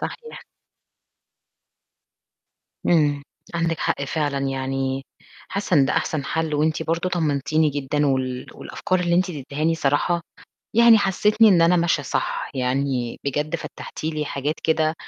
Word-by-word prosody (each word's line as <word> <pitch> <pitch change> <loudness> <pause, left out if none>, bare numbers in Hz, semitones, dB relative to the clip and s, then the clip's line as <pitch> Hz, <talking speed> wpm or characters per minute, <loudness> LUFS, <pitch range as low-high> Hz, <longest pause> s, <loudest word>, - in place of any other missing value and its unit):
صحيح. 465 -1 -7 2.5
إمم، 145 -4 +3 0.3
عندِك 165 -1 0
حق 140 - -1
فعلًا. 145 0 -1
يعني 135 0 -2 0.5
حاسّة 200 -1 -1
إن 140 - +6
ده - - 0
أحسن 150 -3 -1
حَل 160 +1 -1
وأنتِ 155 +2 +1
برضه 165 +3 -1
طمّنتيني 155 -2 +1
جدًا 145 +1 -1
وال 130 -2 -1
والأفكار 185 -3 -2
اللي 175 -1 +1
أنتِ 185 +1 +2
ادّتيهاني 150 +1 -2
الصراحة، 160 +3 +1 0.5
يعني 235 -1 +8
حسّيتني 210 +3 +4
إن 175 -5 +5
أنا 175 +2 +5
ماشية 170 -3 +1
صح، - - -2
يعني 130 -1 -1
بجد 150 +4 -1
فتّحتِ 160 - -9
لي 155 -1 -1
حاجات 145 +1 -2
كده 160 0 +2
155 Hz, 130 wpm, -23 LUFS, 140-170 Hz, 2.5 s, يعني